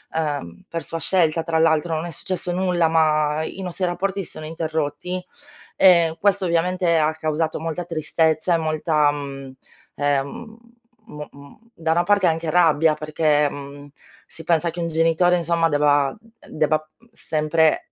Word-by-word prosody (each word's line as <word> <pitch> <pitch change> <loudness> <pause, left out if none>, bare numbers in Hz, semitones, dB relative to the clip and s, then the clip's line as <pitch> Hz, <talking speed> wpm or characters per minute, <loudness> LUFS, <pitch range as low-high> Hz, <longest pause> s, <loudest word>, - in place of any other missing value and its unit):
uhm, 145 - -3
per 165 -1 -5
sua 165 - -5
scelta 165 -2 +1
tra 160 -1 -1
l'altro, 160 0 +2
non 160 +2 -3
è 175 - -6
successo 180 +3 -4
nulla, 180 -2 +1
ma 155 -1 +2
i 190 - -7
nostri 185 0 -3
rapporti 190 +2 -2
si - - -13
sono 155 - -9
interrotti. 160 +2 -3 0.5
E 170 -3 +5
questo 200 -1 +2
ovviamente 175 0 +1
ha 155 0 +2
causato 155 0 -2
molta 165 +2 -4
tristezza 160 0 0
e - - +2
molta, 155 -2 +1
mhmm, 135 -2 -7 0.4
ehm 145 +11 -2 0.5
mo 150 0 -8
m 140 0 -15 0.2
da 160 -1 -5
una 170 +2 +2
parte 200 0 +3
anche 160 -1 -1
rabbia 160 -2 +4
perché 155 -1 +1
mhmm, 145 0 -10 0.4
si 165 - -11
pensa 170 0 +1
che 170 - -7
un 170 - -2
genitore 165 +2 +2
insomma 170 -1 +1
debba 145 -1 +2 0.3
debba 155 0 0 0.3
sempre, 155 -1 0
160 Hz, 155 wpm, -22 LUFS, 150-175 Hz, 0.5 s, E